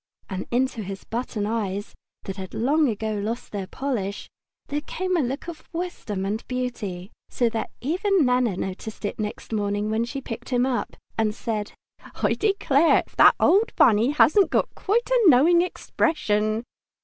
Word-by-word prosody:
And 185 0 -4
into 250 -1 0
his 195 -1 -6
boot - - -33 0.2
button 210 -3 -3
eyes, 205 -2 -2 0.3
that 195 0 -6
had 190 -1 -7
long 285 +5 +2
ago 220 0 -2
lost 215 +3 -4
their 195 -3 -4
polish, 210 -6 -3 0.4
there 290 +1 -3
came 370 +4 -2
a - - +2
look 270 +5 -3
of 340 -3 -9
wisdom 330 - -4
and 210 +3 -2
beauty, 230 -7 -4 0.2
so 240 -2 +1
that 225 0 -3
even 365 - +2
Nana 250 -6 +2
noticed 200 +4 -5
it 205 - -4
next 210 +1 -5
morning 205 0 -1
when 220 +1 +1
she 275 +3 -5
picked 240 -2 -7
him 250 -1 +2
up, 255 -2 -2 0.2
and 215 -1 +1
said, 215 -3 -3 0.4
"I - - +1
declare 335 -7 +3
if - - -26
that - - +8
old 430 +5 +3
Bunny 230 +1 +5
hasn't 315 +6 +4
got - - 0
quite 450 +5 0
a - - +4
knowing 325 +6 +6
expression!" 220 -11 0
235 Hz, 170 wpm, -24 LUFS, 210-295 Hz, 0.4 s, that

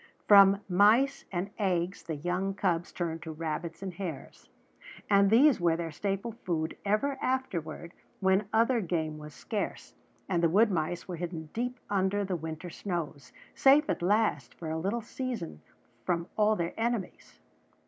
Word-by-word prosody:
From 200 -1 +7
mice 220 +9 +4
and 190 +2 -3
eggs 185 -1 0
the 160 - -5
young 180 +5 -2
cubs 170 -3 0
turned 165 -2 -3
to 160 - -6
rabbits 165 +3 -4
and 190 -2 -4
hares; 170 -7 -7 0.6
and 200 0 +5
these 260 +6 +5
were 170 -1 +3
their 165 -1 -4
staple 200 +7 -3
food 165 -7 -3
ever 265 +7 0
afterward 170 -11 -3 0.3
when 190 +1 +2
other 230 +2 +3
game 160 -4 -2
was 150 0 -10
scarce 215 -3 -4 0.3
and 175 -3 0
the 170 - +4
wood 210 +5 +4
mice 170 0 -2
were 180 -2 -5
hidden 165 -2 -5
deep 245 +2 -3
under 200 +1 0
the 190 -1 -2
winter 160 +1 -6
snows, 160 -8 -5 0.2
safe 285 +3 +5
at - - -3
last 180 - +1
for 160 -2 -6
a 160 - -2
little 205 +7 -2
season 235 - -5 0.4
from 170 +2 0
all 215 0 +3
their 170 -3 -2
enemies. 230 -4 -3
185 Hz, 160 wpm, -29 LUFS, 165-210 Hz, 0.6 s, From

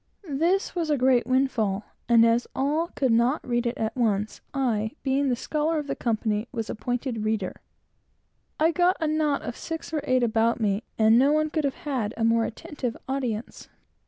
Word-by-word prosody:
This 340 +8 +1
was 335 -3 -2
a 295 - +2
great 250 -2 +3
windfall, 240 -6 +1 0.3
and 230 -1 +7
as 230 +1 +2
all 300 +5 +1
could 265 -3 +1
not 240 +7 +2
read 240 0 0
it 235 - -3
at 220 +3 -2
once, 215 -4 0
I, 225 -5 0
being 275 0 +1
the 250 - +2
scholar 305 +5 -1
of 300 - -2
the - - -3
company, 220 -1 -1
was 225 -3 -4
appointed 245 -1 -3
reader. 215 -3 -2 1.0
I 320 +2 +4
got 355 +2 +2
a 320 - 0
knot 305 -2 +1
of 240 - -5
six 325 0 -6
or 305 - 0
eight 255 -1 +2
about 230 +1 +2
me, 205 -2 +1 0.2
and 220 +1 +5
no 275 +3 +4
one 310 0 +1
could 310 -2 0
have 275 - -1
had 245 -7 -2
a 225 - -1
more 230 0 +3
attentive 275 -3 -5
audience. 250 -5 -4
250 Hz, 190 wpm, -26 LUFS, 225-295 Hz, 1.0 s, and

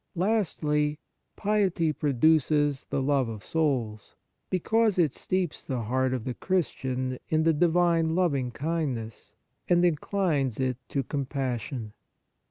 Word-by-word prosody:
Lastly, 155 -7 +1 0.4
piety 195 -6 +1
produces 145 0 +2
the 135 - -2
love 135 -3 +1
of 110 -3 -7
souls, 125 -10 -1 0.3
because 220 +3 +2
it 160 -6 +3
steeps 185 -3 -2
the 130 -4 -3
heart 130 +3 0
of 130 -3 -2
the 125 - -3
Christian 130 -8 -2
in 155 0 +2
the 165 0 +4
divine 165 0 +2
loving 140 -9 +1
kindness, 135 -6 -4 0.3
and 175 0 +4
inclines 155 - 0
it 130 -2 0
to 140 - -1
compas 135 -3 -2
sion. 110 -3 -6
150 Hz, 125 wpm, -27 LUFS, 130-170 Hz, 0.4 s, the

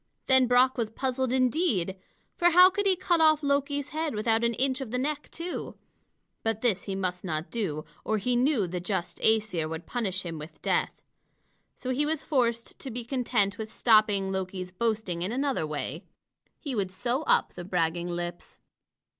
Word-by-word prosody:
Then 260 -1 +5
Brock 250 +1 +4
was 225 -2 0
puzzled 260 +2 -1
indeed, 255 - +1 0.4
for 350 - +4
how 360 +2 +8
could 405 +1 0
he 380 - +4
cut 350 -2 +1
off 310 -1 +5
Loki's 285 0 0
head 310 -4 -2
without 225 +2 +1
an 235 0 +1
inch 260 +2 +1
of 265 - -5
the 250 - -2
neck, 290 +3 -2
too? 345 +2 -5 0.7
But 225 -1 -1
this 215 -7 +1
he 195 - -3
must 180 -2 -2
not 160 -3 -3
do, 160 -10 -3 0.2
or 220 - 0
he 245 +4 0
knew 250 -4 +2
the 180 +1 -4
just 180 -1 -3
Æsir 210 -8 +1
would 160 +1 -6
punish 195 -6 -2
him 165 -3 -5
with 150 +2 -10
death. - - 0 0.7
So 255 - -4
he 290 +4 +1
was 315 -1 -1
forced 235 -5 0
to 270 - -5
be 240 -1 -5
content 235 -6 0
with 220 0 -5
stopping 215 -5 +3
Loki's 185 -1 -4
boasting 210 -3 -1
in 185 +4 -2
another 265 - 0
way. 150 -1 -4 0.5
He 285 -5 -4
would 200 -5 -1
sew 240 +9 -1
up - - +3
the 175 - -7
bragging 175 -1 -1
lips. 175 0 -5
225 Hz, 180 wpm, -28 LUFS, 185-265 Hz, 0.7 s, how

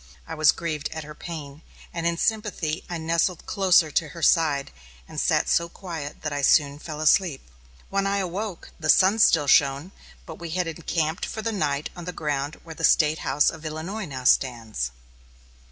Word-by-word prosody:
I 165 - -6
was 155 -2 +5
grieved 155 -3 -4
at 160 -1 -5
her 150 +1 -9
pain, 150 -3 -8 0.3
and 170 0 -1
in 170 0 0
sympathy 195 -7 -1
nestled 165 +1 -1
closer 180 -5 +3
to 160 +1 +1
her 165 +2 -9
side 150 -5 +3 0.4
and - - -3
sat - - +2
so 170 0 +2
quiet 165 -6 -7
that 155 -1 -2
I 145 - -2
soon 145 0 +3
fell 150 -1 -7
asleep. 155 - +2 0.4
When 195 0 +1
I 200 0 +1
awoke, 190 +1 -4
the 155 -1 -3
sun 195 +7 +5
still 165 -8 +5
shone, 140 +4 +3 0.3
but 160 - -9
we 170 -1 -6
had 180 - +1
encamped 165 0 -2
for 220 - -5
the 225 - -1
night 150 -8 -1
on 175 -1 -8
the 180 - -5
ground 145 -1 -3
where 165 - -9
the 165 +1 -9
State 155 -1 +4
House 145 +2 +2
of 160 - -11
Illinois 165 +7 -5
now 135 -5 -7
stands. 115 - +1
160 Hz, 185 wpm, -25 LUFS, 150-175 Hz, 0.4 s, was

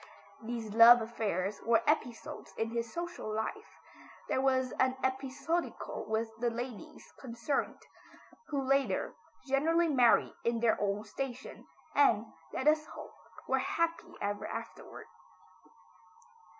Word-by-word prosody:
These 225 -2 -5
love 235 +2 +9
affairs 210 -4 -2
were 230 -1 +3
episodes 245 -6 -2
in 225 0 -1
his 235 -1 -3
social 345 -9 -5
life. 220 - -4 0.5
They - - +1
were 265 0 +3
as 260 -1 -1
episodical 265 +5 -1
with 225 +1 -2
the 240 0 +1
ladies 245 +6 -7
concerned, 255 +2 -3 0.6
who 280 -3 -1
later, 275 0 +1 0.3
generally 320 +5 +2
married 250 -5 +4
in 235 0 +1
their 225 -2 +2
own 205 +1 0
station, 255 +3 -6 0.3
and, 230 -7 +4 0.3
let 260 - -2
us 305 0 +5
hope - - -10 0.3
were 265 - +2
happy 335 +5 -1
ever 205 0 -3
afterward. - - -8
245 Hz, 120 wpm, -32 LUFS, 225-275 Hz, 0.6 s, love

